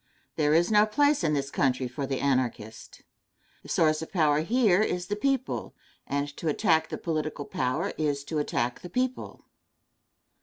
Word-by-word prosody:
There 150 0 +2
is 170 +5 +3
no 210 0 +5
place 290 +2 +2
in 155 -2 +2
this 140 0 -2
country 130 -1 +1
for 135 +3 -5
the 135 -1 -2
Anarchist. 125 -5 -2 0.6
The - - -14
source 155 -1 +2
of 160 - -7
power 150 -5 +3
here 210 +2 +3
is 180 -4 -1
the 205 - -2
people, 270 +4 -2 0.3
and 140 +1 -1
to 165 - -4
attack 160 +2 +2
the - - -4
political 155 -3 -3
power 130 0 -2
is 145 -2 0
to 150 +2 -3
attack 120 -4 -1
the 180 - -9
people. 255 +5 -3
155 Hz, 165 wpm, -27 LUFS, 140-190 Hz, 0.6 s, no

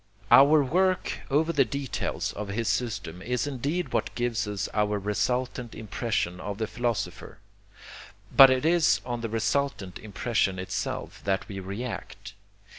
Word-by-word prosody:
Our 145 +2 +8
work 185 +7 +1
over 155 +4 +2
the 140 -3 +5
details 135 +3 -3
of 105 0 -5
his 110 +3 -2
system 100 -8 -2
is 125 +5 -1
indeed 145 +5 -2
what 115 - -1
gives 120 -4 -1
us 105 0 -2
our 105 -1 +1
resultant 120 +4 -2
impression 105 -4 -2
of 100 +1 -5
the 110 - -1
philosopher, 120 0 -3 1.0
but 135 -1 +10
it 130 +2 +1
is 170 0 +4
on 120 -1 -3
the 115 - -3
resultant 110 -2 -1
impression 105 -2 -1
itself 95 0 -4
that 95 -2 0
we 95 -1 -6
react. 100 0 -6
115 Hz, 140 wpm, -27 LUFS, 100-135 Hz, 1.0 s, but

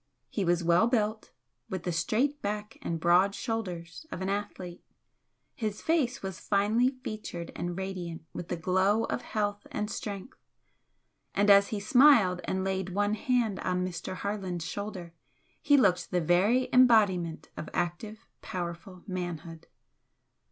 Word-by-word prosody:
He 200 - -1
was 175 -1 +1
well 175 +6 +4
built, 220 -3 -1 0.4
with 190 -4 -4
the 175 - -1
straight 245 - 0
back 210 +1 -4
and 165 -1 -3
broad 180 +4 +4
shoulders 185 - -4
of - - -5
an 190 - -1
athlete, 195 -3 -4 0.7
his 215 -3 -4
face 275 -7 +1
was 190 -3 -5
finely 215 +5 +2
featured 175 -6 -6
and 175 0 -4
radiant 180 -4 -5
with 175 - -6
the 175 - -2
glow 190 +6 +2
of - - -2
health 205 -1 -2
and 210 0 -3
strength, 205 +6 -6 1.0
and 205 +1 +5
as 200 0 +7
he 215 - -3
smiled 215 -5 +5
and 190 0 -1
laid 190 -1 -1
one 205 +1 +2
hand 225 -3 0
on 180 0 -1
Mr. 180 0 -5
Harland's 185 -4 -3
shoulder 190 -4 -6 0.5
he 285 - +5
looked 190 -8 +3
the 180 - +1
very 190 +10 +3
embodiment 205 -10 +4
of 155 - -6
active, 210 +6 -3 0.2
powerful 175 0 -6
manhood. 175 -4 -5
195 Hz, 145 wpm, -29 LUFS, 175-215 Hz, 1.0 s, as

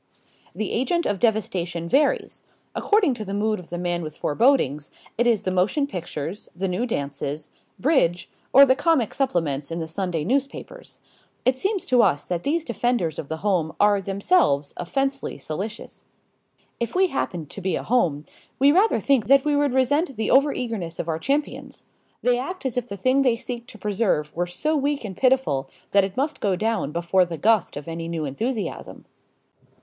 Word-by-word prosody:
The 215 - -2
agent 305 +8 0
of 205 -2 -1
devastation 180 -7 0
varies. 280 - +1 0.3
According 410 -9 +2
to 220 - -5
the 200 -1 -4
mood 215 0 0
of 175 - -13
the 175 - -4
man 175 0 -1
with 155 -2 -7
forebodings, 150 - +2 0.3
it 240 +1 +2
is 220 -4 +2
the 185 - -1
motion 190 +11 +1
pictures, 175 - -6
the 190 +2 -2
new 190 +7 -1
dances, 145 - -3 0.3
bridge, 240 - +2 0.2
or 275 +2 +9
the 260 -1 +4
comic 295 -8 +1
supplements 165 - -1
in 165 - -4
the 165 - -3
Sunday 165 -1 -2
newspapers. 280 - -3 0.5
It 255 - +4
seems 385 +8 -1
to 250 -1 +4
us 145 -8 +2
that 175 -2 -2
these 320 - 0
defenders 235 -9 -1
of 140 - -5
the 160 +6 -6
home 175 -6 +1
are 205 -1 +4
themselves 195 - +1
offensively 270 +8 -2
solicitous. 195 +10 -6 0.8
If 235 +5 -3
we 375 0 +4
happened 170 - -3
to 200 - -6
be 190 0 0
a - - -3
home, 165 -12 +1 0.3
we 275 +2 +5
rather 390 +8 +3
think 265 -7 +2
that 275 +2 +5
we 295 -1 +2
would 285 -1 +2
resent 275 +3 +2
the 220 - -1
overeagerness 230 - +1
of 170 - -3
our 160 0 -1
champions. 285 - -2 0.4
They 245 0 +3
act 330 +5 -5
as 260 - -1
if 245 -1 -2
the 200 - -5
thing 255 +7 +2
they 250 -4 +3
seek 240 0 -6
to 220 - -11
preserve 195 -7 -1
were 175 +1 -1
so 300 - -1
weak 285 -3 -1
and 190 -3 -6
pitiful 255 - +1 0.2
that 200 -1 +5
it 195 +2 -4
must 290 +4 -1
go 195 -3 +1
down 215 -6 -1
before 170 +3 +2
the 170 -2 -5
gust 215 -4 +2
of 145 - -8
any 165 0 -5
new 165 -2 -3
enthusiasm. 220 - -4
215 Hz, 185 wpm, -24 LUFS, 170-265 Hz, 0.8 s, or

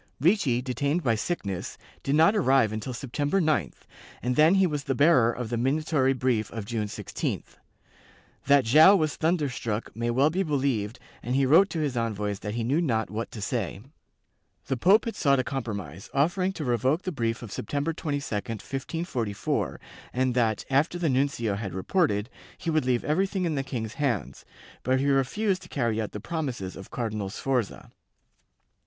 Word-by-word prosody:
Ricci, 145 - +2
detained 140 +6 -1
by 115 - +3
sickness, 105 - -3 0.2
did 135 - 0
not 165 +7 +5
arrive 135 - +3
until 110 +4 -4
September 145 +7 -1
9th, 145 - 0 0.4
and 125 +1 0
then 155 +6 +6
he 195 -1 +4
was 150 -5 -2
the 135 - 0
bearer 135 -5 +5
of 120 -2 -5
the 120 - 0
minatory 135 +1 +1
brief 125 -5 0
of 110 -3 -6
June 110 -1 -2
16th. - - -5 0.9
That 140 -3 +5
Joao 155 - +8
was 155 -5 +1
thunderstruck 140 -9 -1
may 120 +1 -1
well 135 +6 +3
be 185 +4 0
believed 130 - -1 0.2
and 125 +2 -2
he 135 0 +3
wrote 170 +9 +6
to 165 - -2
his 145 -4 -1
envoys 105 -4 -2
that 105 +1 -5
he 120 - -1
knew 140 +8 +1
not 115 -9 0
what 110 +2 -3
to 110 - -8
say.^ 110 +3 -3 0.7
The 135 - -1
pope 195 - +4
sought 140 -2 +3
a 130 - +1
compromise, 100 - -5
offering 175 +7 +2
to 155 - -5
revoke 130 +7 +1
the 185 - -2
brief 115 -5 -2
of 110 - -8
September 145 +11 -2
22, 145 -3 -3
1544, 115 - -3 0.3
and 130 0 +1
that, 115 -4 +1
after 150 +6 +2
the 170 -3 0
nuncio 130 -5 +1
had 100 -3 -4
reported, 105 - +1 0.3
he 165 - -2
would 155 -4 +1
leave 125 -2 +1
everything 190 +4 0
in 165 - 0
the 140 - 0
king's 115 -5 -4
hands, 125 - -2 0.4
but 130 +1 +1
he 135 - 0
refused 185 - +1
to - - -13
carry 115 -5 0
out 110 - -4
the 105 - -6
promises 125 - -4
of 95 - -10
Cardinal 105 -5 -3
Sforza. 125 0 -2
130 Hz, 175 wpm, -27 LUFS, 115-155 Hz, 0.9 s, Joao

